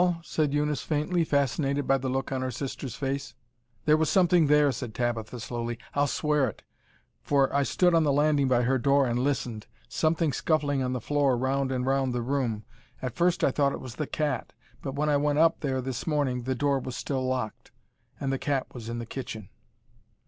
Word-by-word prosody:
said 155 -3 0
Eunice 150 0 0
faintly, 160 +3 0
fascinated 140 -1 0
by 135 - +4
the 130 -1 -2
look 135 +2 -2
on 130 -1 -1
her 130 - -1
sister's 130 -1 -5
face. 135 -1 -3 0.5
"There 155 - +6
was 160 -1 +1
something 175 -4 +4
there," 150 -1 +5
said 125 -4 -6
Tabitha 120 -1 -2
slowly. 120 +1 -4 0.2
"I'll 145 0 +2
swear 150 -2 +1
it, 100 - -12 0.6
for 140 -1 +2
I 140 - +4
stood 175 +5 +2
on 165 -1 +4
the 145 - +2
landing 145 -1 +3
by 125 -1 +3
her 130 +2 +2
door 140 +2 +3
and 120 -1 0
listened; 125 -5 -2 0.2
something 160 -2 +1
scuffling 145 -4 +1
on 130 0 -1
the 125 - -3
floor 140 -1 +2
round 135 +1 0
and 125 -1 -1
round 135 -1 +1
the 120 -1 -1
room. 120 -5 -1 0.4
At 130 -2 -4
first 175 0 +2
I - - +4
thought 140 0 +1
it - - -5
was 125 -3 -9
the 150 - -2
cat, 145 -5 -2 0.3
but 135 -1 -5
when 150 +2 0
I 145 -1 +3
went 145 0 +1
up 165 +1 +4
there 130 -3 -1
this 130 +3 -5
morning 135 -6 0
the 130 0 0
door 140 +1 +1
was 130 -1 -6
still 135 -2 -2
locked, 130 -4 -3 0.5
and 135 -1 -1
the 135 - -2
cat 140 -3 -2
was 115 -2 -7
in 120 - -3
the 120 - -4
kitchen." 110 -5 -7
135 Hz, 205 wpm, -27 LUFS, 125-145 Hz, 0.6 s, There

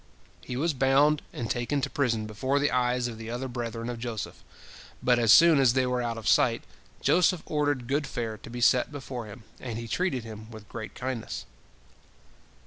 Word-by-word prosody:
" - - -29
He 125 - -5
was 160 +4 +1
bound 140 +3 +3
and 115 - -4
taken 120 +5 -1
to - - 0
prison 115 -6 0
before 130 +6 -1
the 145 +1 +2
eyes 125 0 +1
of 115 -2 -7
the 115 0 -7
other 120 +3 -3
brethren 115 -2 -4
of 120 -1 -4
Joseph, 115 -2 -5 0.6
but 125 -1 +4
as 115 -2 +4
soon 165 0 +8
as 130 -4 +5
they 130 0 +2
were 125 0 0
out 115 -1 -2
of 115 - -6
sight, - - +3 0.4
Joseph 180 0 +3
ordered 145 -4 0
good 145 +2 0
fare 115 -4 -4
to - - -11
be 120 +1 -6
set 125 +3 +4
before 130 -5 -6
him, 105 +2 -11 0.2
and 120 -3 -5
he 115 0 -5
treated 135 -3 -1
him 110 -1 -9
with 110 -2 -11
great 110 -2 -7
kindness. 130 -3 -4
125 Hz, 200 wpm, -28 LUFS, 115-135 Hz, 0.6 s, soon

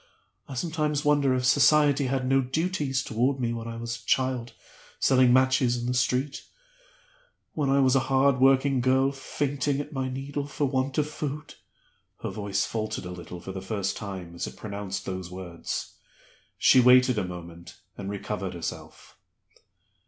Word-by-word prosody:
I 135 - -6
sometimes 150 0 -1
wonder 145 -3 +3
if 125 0 -1
Society 145 +1 +4
had 130 0 -1
no 135 +1 +4
duties 135 -1 -1
toward 130 +5 0
me 120 -2 -1
when 115 0 -5
I 115 0 -6
was 115 0 -5
a - - -23
child 130 -3 0 0.5
selling 130 -2 +4
matches 130 -1 +3
in 120 - -4
the 125 - 0
street 125 +3 0 1.1
when 145 -3 0
I 140 +1 +4
was 130 0 +4
a - - +5
hard 135 0 +3
working 135 0 +4
girl 130 +2 +3
fainting 140 0 -2
at 145 +2 -6
my 130 -1 -2
needle 140 +2 -4
for 145 0 -1
want 130 0 -1
of 150 -1 +2
food." 150 0 -5 0.7
Her - - -2
voice 100 -2 -1
faltered 110 -4 -4
a 90 - -6
little 90 0 -8
for 95 - -7
the 95 0 -6
first 100 -1 -2
time 95 -5 -7
as 85 - -4
it - - -10
pronounced 100 -2 -5
those 95 -2 -5
words; 90 -2 -6 0.6
she 130 - +6
waited 125 -1 +6
a - - -1
moment, 85 -1 -9 0.2
and 100 0 -6
recovered 100 -2 -4
herself. 85 - -8
130 Hz, 165 wpm, -27 LUFS, 105-140 Hz, 1.1 s, she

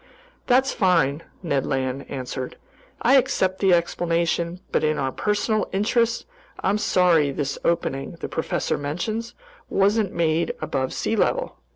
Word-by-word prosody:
"That's 260 +2 +3
fine," 165 -6 +2 0.2
Ned 145 -6 0
Land 135 0 -2
answered. 130 -1 -5 0.5
"I 265 +4 +6
accept 190 -7 +1
the 195 -2 +3
explanation, 170 0 +1
but - - +1
in 155 0 +2
our 135 -1 -1
personal 210 - 0
interests, 230 +4 +1 0.4
I'm 200 +2 +2
sorry 175 -7 +3
this 140 0 -3
opening 135 -5 -1
the 170 - -6
professor 160 - -2
mentions 195 +11 -3 0.3
wasn't 200 0 +2
made 165 0 0
above 130 -1 -2
sea - - -1
level." - - 0
170 Hz, 135 wpm, -24 LUFS, 145-205 Hz, 0.5 s, I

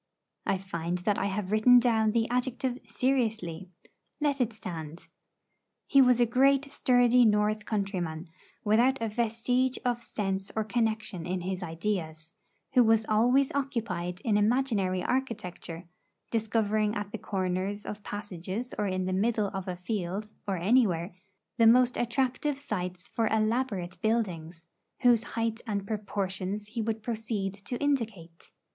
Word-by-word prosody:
I 195 - +2
find 175 -2 -3
that 200 +3 0
I 195 - 0
have 195 -1 -3
written 220 +4 +6
down 225 -3 +3
the 225 +1 +1
adjective 250 0 -1
seriously; 220 -10 -1 0.5
let 285 -3 +1
it 240 -2 +1
stand. 165 -6 -7 0.8
He 275 - +5
was 250 -2 +5
a 240 - +5
great 270 +4 +3
sturdy 245 -3 +4
North 210 -1 +2
countryman, 185 -6 -2 0.4
without 240 +6 +3
a 225 - -1
vestige 240 +3 0
of 240 -1 0
sense 195 -3 -3
or 220 - +1
connection 220 -6 -1
in 180 0 -2
his 185 +1 -3
ideas, 165 -2 -4 0.4
who 250 -2 +6
was 225 -1 +3
always 245 +6 +3
occupied 210 -10 -2
in 215 -3 +2
imaginary 210 -5 +1
architecture, 205 -9 -3 0.4
discovering 215 -1 +1
at 205 -1 -4
the 225 - -5
corners 190 +1 -2
of 210 0 -6
passages 205 +3 -5
or 205 - +1
in 185 -1 -1
the 185 - -1
middle 210 +1 +1
of 190 0 -4
a 180 - -2
field, 195 +2 -3 0.2
or 195 -2 0
anywhere, 180 -3 +2 0.4
the 230 -2 +6
most 250 +1 +5
attractive 260 +4 0
sites 180 -9 -4
for 225 -1 0
elaborate 215 -5 0
buildings, 175 -7 -1 0.4
whose 240 -3 +5 0.2
height 225 0 -1
and 200 -2 -2
proportions 200 -1 -3
he 230 +1 -3
would 220 0 -2
proceed 215 -4 -2
to 205 +5 -5
indicate. 225 - -2
215 Hz, 140 wpm, -29 LUFS, 185-240 Hz, 0.8 s, written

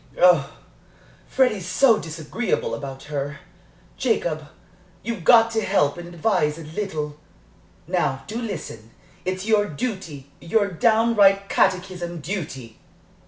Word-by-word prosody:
Oh, 170 -6 +5 0.7
Freddie's 215 -9 +1
so 225 +4 +4
disagreeable 165 +8 -3
about 135 -1 -6
her. 145 0 -4 0.6
Jacob, 165 - -1 0.6
you've 225 -5 -4
got 230 +3 +6
to 225 -1 0
help 185 -8 +2
and 170 - -8
advise 170 -3 0
a 165 - -8
little. 155 -3 -4 0.7
Now, 135 0 -1
do 225 +3 -5
listen. 165 - -6 0.4
It's 185 +1 -2
your 215 -2 +3
duty 155 - -5
your 200 +4 +1
downright 205 0 +3
catechism 180 -2 0
duty." 145 - -6
180 Hz, 115 wpm, -23 LUFS, 150-215 Hz, 0.7 s, got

